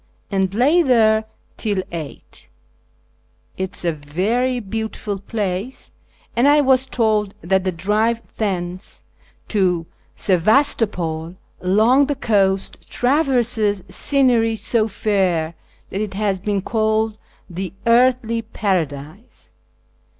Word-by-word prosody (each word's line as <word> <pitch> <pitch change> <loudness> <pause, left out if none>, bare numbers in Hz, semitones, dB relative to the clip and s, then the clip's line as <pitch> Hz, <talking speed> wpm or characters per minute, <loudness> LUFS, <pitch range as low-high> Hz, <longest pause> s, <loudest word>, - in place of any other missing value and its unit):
and 190 -1 0
lay 290 +10 +4
there 220 -6 +3 0.3
till 210 -3 -2
8. 160 -4 -9 1.1
It 190 0 -4
is - - -4
a 170 - +2
very 200 - -1
beautiful 220 -1 -4
place, 200 +3 -4 0.4
and 240 +4 +3
I 295 +1 +6
was 265 -2 +3
told 215 -5 0
that 190 +2 +1
the 185 - +1
drive 210 +7 0 0.2
thence 185 -3 -4 0.5
to 180 -5 +1 0.3
Sebastopol 185 - +1 0.3
along 220 +9 +4
the 290 - -1
coast 195 -6 0
traverses 245 - +1
scenery 235 0 +2
so 220 0 +1
fair 190 -6 0 0.4
that 195 - -2
it 205 -3 -4
has 200 -2 0
been 200 +1 -1
called 220 -1 0 0.2
" - - -34
the 185 0 -5
Earthly 235 -1 +3
Paradise." 180 - -4
210 Hz, 110 wpm, -20 LUFS, 185-235 Hz, 1.1 s, I